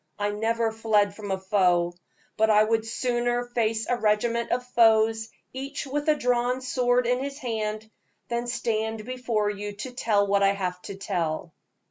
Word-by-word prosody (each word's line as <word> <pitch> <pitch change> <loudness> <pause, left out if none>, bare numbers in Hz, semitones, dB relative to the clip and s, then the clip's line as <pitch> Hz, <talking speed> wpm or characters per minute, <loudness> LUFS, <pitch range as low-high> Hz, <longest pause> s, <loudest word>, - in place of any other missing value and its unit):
I 205 0 0
never 225 +2 0
fled 215 -2 +1
from 205 -1 -7
a 190 - 0
foe, 180 -3 +2 0.4
but 220 0 +3
I 210 0 +6
would 225 0 0
sooner 240 +1 0
face 225 -2 -1
a 245 - +1
regiment 230 +2 +1
of 250 +1 0
foes, 225 -2 +3 0.2
each 275 +3 -5
with 290 +3 -2
a 305 - +5
drawn 250 -1 +1
sword 250 -1 +1
in 250 +1 +1
his 275 +1 -4
hand, 220 -4 -3 0.4
than 235 0 -2
stand 220 -2 -2
before 235 -4 -1
you 205 0 -5
to 215 +6 -7
tell 215 -5 +1
what 200 0 +2
I 195 0 +4
have 180 -2 -3
to 200 - -5
tell." 170 -5 -3
225 Hz, 170 wpm, -26 LUFS, 205-245 Hz, 0.4 s, I